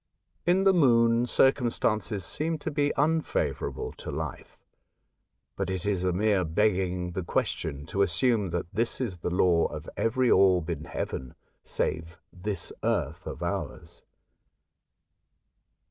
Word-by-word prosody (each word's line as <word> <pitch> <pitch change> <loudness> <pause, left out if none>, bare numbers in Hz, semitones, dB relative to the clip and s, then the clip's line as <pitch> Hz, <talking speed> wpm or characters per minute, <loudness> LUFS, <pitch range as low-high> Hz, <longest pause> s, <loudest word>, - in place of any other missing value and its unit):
In 185 +2 +4
the 195 0 +5
Moon, 120 -6 +4
circumstances 115 -7 +1
seem 160 - -1
to 155 - -4
be 145 0 +1
unfavourable 160 +2 0
to - - -7
life; 75 -2 -6 1.0
but 95 -2 -2
it 95 -1 -3
is 100 -3 0
a 90 - +2
mere 100 +1 +2
begging 90 0 0
the 95 - -3
question 70 -4 -2
to 100 +5 -1
assume 105 +2 +2
that 85 0 -2
this 115 +4 0
is 115 -9 -2
the 85 - -3
law 90 -1 +3
of - - -8
every 125 +2 +2
orb 90 -3 +4
in 80 -1 -5
heaven 65 -6 -5 0.3
save 80 +2 -2
this 95 -1 -4
earth - - -1
of - - -5
ours. - - -5
100 Hz, 130 wpm, -28 LUFS, 90-120 Hz, 1.0 s, the